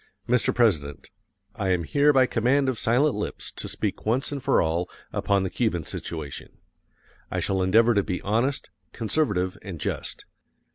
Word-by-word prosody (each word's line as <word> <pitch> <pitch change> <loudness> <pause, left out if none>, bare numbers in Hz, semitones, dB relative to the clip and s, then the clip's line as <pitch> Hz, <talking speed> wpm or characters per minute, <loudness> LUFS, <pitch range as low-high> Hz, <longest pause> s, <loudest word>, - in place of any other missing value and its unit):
] 100 - -40
Mr. 125 0 +3
President, 75 - +1 0.4
I 100 -4 -2
am 90 -2 +1
here 145 - +3
by 135 -2 +5
command 130 +4 +2
of 125 - -2
silent 130 +6 +3
lips - - -4
to - - -6
speak - - -3
once 125 +7 0
and 140 -1 -4
for 135 +1 +3
all 85 +2 0 0.2
upon 100 -1 +1
the 95 - -1
Cuban 105 -9 0
situation. 75 -2 -6 0.7
I - - -2
shall 95 -1 0
endeavor 110 +6 +4
to 100 - +3
be 90 -2 -3
honest, 120 +7 0 0.2
conservative, 105 -7 0
and 95 -6 -7
just. - - -4
110 Hz, 165 wpm, -25 LUFS, 90-125 Hz, 0.7 s, by